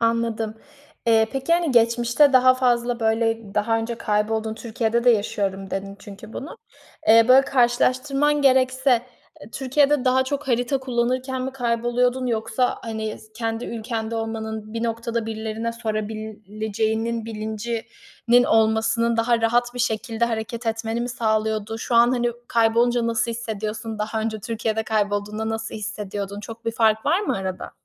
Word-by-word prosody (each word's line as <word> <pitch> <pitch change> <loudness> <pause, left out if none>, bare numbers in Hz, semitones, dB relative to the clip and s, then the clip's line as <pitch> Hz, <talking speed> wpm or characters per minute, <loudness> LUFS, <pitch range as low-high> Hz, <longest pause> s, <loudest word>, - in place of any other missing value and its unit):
Anladım. 230 -1 0 0.5
Eee, 225 -1 +4
peki, 270 +4 -1
hani, 340 -2 +2
geçmişte 240 +4 +4
daha 255 0 +6
fazla 245 -1 +1
böyle 225 -2 0
daha 225 +2 +1
önce 225 +1 -3
kaybolduğun, 220 0 -1
Türkiye'de 230 0 -1
de 245 - +7
yaşıyorum 195 -3 -1
dedin 195 +1 -4
çünkü 205 +2 -11
bunu. 285 - -7 0.5
Eee, 225 +1 +8
böyle 260 +1 +8
karşılaştırman 275 +3 +2
gerekse, 260 0 +3 0.5
eee, 210 - -12
Türkiye'de 275 +1 +2
daha 260 0 +3
çok 285 +1 -4
harita 245 +2 +1
kullanırken 255 +1 -1
mi 265 +1 -4
kayboluyordun 245 +1 0
yoksa, 235 +1 0
hani, 220 -1 -4
s 215 - -18
kendi 225 0 -3
ülkende 225 0 -4
olmanın 220 -1 -4
bir 230 - -2
noktada 230 0 -2
birilerine 220 +1 -3
sorabileceğinin 220 0 -3
bilincinin 230 - -1
olmasının 225 +1 +2
daha 230 0 +2
rahat 240 +2 +1
bir - - -6
şekilde 225 -1 0
hareket 230 0 -4
etmeni 225 +1 -1
mi 240 - -2
sağlıyordu? 220 -2 -1
Şu 235 - -3
an, 235 +1 +6
hani, 240 -1 +1 0.2
kaybolunca 235 +1 +2
nasıl 230 0 0
hissediyorsun? 220 -1 -4
Daha 220 +1 -2
önce 220 -1 -3
Türkiye'de 220 0 -2
kaybolduğunda 210 0 -1
nasıl 225 0 -4
hissediyordun? 205 -2 -5
Çok 225 +2 -10
bir 230 - -1
fark 220 -1 +2
var 340 +6 +3
mı 415 - -1
arada? 190 -1 -5
230 Hz, 145 wpm, -23 LUFS, 220-245 Hz, 0.5 s, Eee